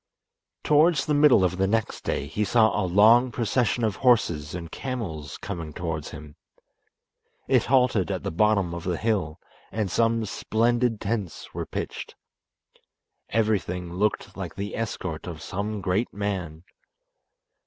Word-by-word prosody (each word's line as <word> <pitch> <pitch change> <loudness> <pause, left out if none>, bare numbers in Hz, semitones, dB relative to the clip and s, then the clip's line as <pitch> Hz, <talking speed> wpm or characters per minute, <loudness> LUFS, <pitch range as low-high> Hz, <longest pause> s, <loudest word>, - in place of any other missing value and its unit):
Towards 150 -1 +4
the 150 - 0
middle 145 -8 +6
of 90 0 0
the 95 0 +2
next 110 +1 -1
day 70 - -2
he 105 +9 -2
saw 110 +2 +3
a - - +1
long 115 +7 +6
procession 120 +1 0
of 110 -3 0
horses 85 - +2
and 85 -2 -7
camels 105 - -5
coming 85 -6 -6
towards 80 -3 -4
him. 75 0 -11 1.1
It - - +3
halted 125 - +2
at - - -3
the - - -2
bottom 100 -1 +2
of 85 -1 -6
the 90 -2 -1
hill, 100 -9 -1 0.3
and 105 -3 -2
some 115 +1 +2
splendid 115 +2 0
tents 100 -4 -4
were - - -4
pitched. - - -5 1.1
Everything 95 -6 -1
looked 105 +4 -1
like - - -6
the 100 +1 -4
escort 95 -7 -4
of 85 -3 -6
some 100 +4 -4
great 95 +6 0
man. 95 -6 -4
105 Hz, 145 wpm, -25 LUFS, 90-115 Hz, 1.1 s, middle